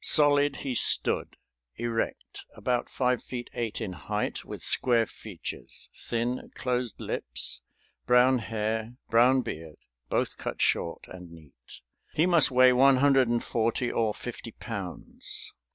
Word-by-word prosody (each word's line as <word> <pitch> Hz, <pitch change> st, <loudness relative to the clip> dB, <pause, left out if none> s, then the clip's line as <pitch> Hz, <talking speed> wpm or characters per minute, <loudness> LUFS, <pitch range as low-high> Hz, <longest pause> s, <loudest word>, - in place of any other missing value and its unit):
Solid 145 Hz, -1 st, +4 dB
he 135 Hz, -, -1 dB
stood, -, -, 0 dB, 0.4 s
erect, 115 Hz, -1 st, -3 dB
about 125 Hz, -1 st, -1 dB
five 125 Hz, -2 st, +1 dB
feet 120 Hz, -1 st, -7 dB
eight 115 Hz, -2 st, -3 dB
in 105 Hz, -5 st, -4 dB
height, -, -, -3 dB
with -, -, -8 dB
square 120 Hz, -3 st, +3 dB
features, 105 Hz, -5 st, -8 dB
thin, 120 Hz, +2 st, -2 dB
closed 125 Hz, -2 st, -2 dB
lips, -, -, -2 dB, 0.5 s
brown 125 Hz, +1 st, +5 dB
hair, 110 Hz, +1 st, -2 dB, 0.2 s
brown 125 Hz, +3 st, +5 dB
beard, 80 Hz, -5 st, -7 dB, 0.3 s
both -, -, 0 dB
cut -, -, -4 dB
short, 85 Hz, -, 0 dB
and 90 Hz, -1 st, -10 dB
neat. 75 Hz, -7 st, -15 dB, 0.3 s
"He 160 Hz, -, +4 dB
must 170 Hz, -5 st, +6 dB
weigh 130 Hz, -1 st, +6 dB
one 135 Hz, +2 st, +6 dB
hundred 135 Hz, -1 st, +4 dB
and 120 Hz, 0 st, 0 dB
forty 115 Hz, +2 st, 0 dB
or 110 Hz, -2 st, 0 dB
fifty 120 Hz, -2 st, -7 dB
pounds. 100 Hz, -6 st, -6 dB
120 Hz, 135 wpm, -28 LUFS, 110-130 Hz, 0.5 s, must